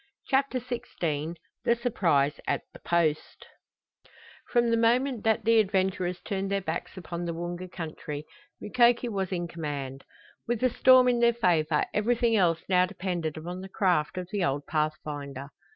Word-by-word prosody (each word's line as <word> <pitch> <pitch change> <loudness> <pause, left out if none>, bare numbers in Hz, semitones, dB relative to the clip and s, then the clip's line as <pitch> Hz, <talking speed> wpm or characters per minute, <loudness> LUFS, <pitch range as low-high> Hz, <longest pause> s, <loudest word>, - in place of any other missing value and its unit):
CHAPTER 270 -1 +2
XVI 170 - -3 0.3
THE 235 - +3
SURPRISE 165 - +1
AT - - 0
THE - - -12
POST 165 -3 0 1.0
From 240 -2 +2
the - - +4
moment 240 +1 +2
that 220 0 +2
the 230 0 +5
adventurers 190 -3 0
turned 195 -1 -3
their 200 0 +1
backs 170 0 -5
upon 175 -1 -5
the 170 -1 -3
Woonga 175 +2 -5
country 155 -3 -6 0.3
Mukoki 240 +1 +3
was 195 -3 -2
in 175 -2 -2
command. 140 -5 -5 0.4
With 240 -1 0
the 255 +1 +2
storm 255 +1 +6
in 245 -1 +3
their 235 0 +4
favor 165 -8 +2
everything 230 +2 +2
else 170 -5 +2
now 180 -1 +4
depended 175 -5 -3
upon 175 +3 -6
the 190 - -8
craft 180 -5 +1
of 180 -1 -4
the 205 -3 0
old 145 -3 -1
pathfinder. 145 -3 -3
185 Hz, 155 wpm, -28 LUFS, 160-230 Hz, 1.0 s, storm